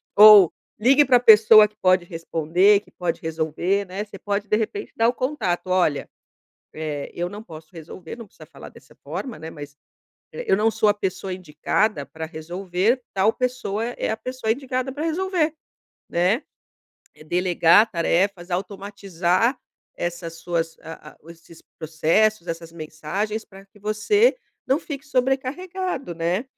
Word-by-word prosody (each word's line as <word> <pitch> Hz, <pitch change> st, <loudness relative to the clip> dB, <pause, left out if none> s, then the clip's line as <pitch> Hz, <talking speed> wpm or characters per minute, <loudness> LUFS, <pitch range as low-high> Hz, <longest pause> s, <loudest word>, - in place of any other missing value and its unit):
ou 210 Hz, -4 st, +9 dB, 0.3 s
ligue 270 Hz, +6 st, +5 dB
pra 250 Hz, -3 st, +4 dB
pessoa 215 Hz, -2 st, +8 dB
que 210 Hz, -, -30 dB
pode 185 Hz, -2 st, +2 dB
responder, 170 Hz, +4 st, +2 dB
que -, -, -24 dB
pode 175 Hz, -2 st, -3 dB
resolver, 160 Hz, +5 st, -1 dB
né. 195 Hz, +3 st, -5 dB
Você 200 Hz, -1 st, -12 dB
pode 205 Hz, +1 st, -3 dB
de 210 Hz, -, +2 dB
repente 225 Hz, -, -3 dB
dar 225 Hz, -, +3 dB
o -, -, -1 dB
contato, 255 Hz, -10 st, -2 dB
"olha, 175 Hz, -6 st, +1 dB, 0.7 s
eh, 150 Hz, -2 st, -5 dB
eu 175 Hz, +1 st, -3 dB
não 210 Hz, +3 st, -9 dB
posso 155 Hz, -4 st, -12 dB
resolver." 165 Hz, +2 st, -10 dB
Não 235 Hz, -1 st, -10 dB
precisa -, -, -16 dB
falar -, -, -12 dB
dessa -, -, -19 dB
forma, 255 Hz, -, -6 dB
né, 160 Hz, +1 st, -8 dB
mas 145 Hz, -2 st, -10 dB, 0.6 s
"eu 485 Hz, -, 0 dB
não 220 Hz, +2 st, +2 dB
sou 220 Hz, -1 st, +1 dB
a 205 Hz, -, +4 dB
pessoa 190 Hz, -1 st, -4 dB
indicada 180 Hz, -, -1 dB
pra 160 Hz, +3 st, -7 dB
resolver 180 Hz, +8 st, -2 dB
tal 200 Hz, +3 st, +3 dB
pessoa 245 Hz, -4 st, -2 dB
é 240 Hz, +1 st, -3 dB
a 220 Hz, -, -1 dB
pessoa 255 Hz, -1 st, -4 dB
indicada 255 Hz, +1 st, -3 dB
pra 295 Hz, +3 st, -5 dB
resolver," 330 Hz, -1 st, 0 dB, 0.6 s
né. 185 Hz, -, +1 dB, 0.7 s
E -, -, -16 dB
delegar 175 Hz, +4 st, +4 dB
tarefas, 175 Hz, 0 st, 0 dB
automatizar 195 Hz, +2 st, -1 dB, 0.4 s
essas 175 Hz, -1 st, -4 dB
suas, 165 Hz, -1 st, -3 dB
ah 160 Hz, -1 st, -10 dB
ah, -, -, -25 dB
esses 165 Hz, 0 st, -16 dB, 0.2 s
processos, 170 Hz, +6 st, +1 dB
essas 165 Hz, 0 st, -6 dB
mensagens 170 Hz, +7 st, -4 dB
pra 195 Hz, 0 st, -15 dB
que 200 Hz, -, -23 dB
você 215 Hz, -, +2 dB, 0.3 s
não 270 Hz, -, +2 dB
fique 285 Hz, -2 st, -7 dB
sobrecarregado, 275 Hz, -, -2 dB
né. 175 Hz, +7 st, -1 dB
195 Hz, 150 wpm, -23 LUFS, 170-230 Hz, 0.7 s, ou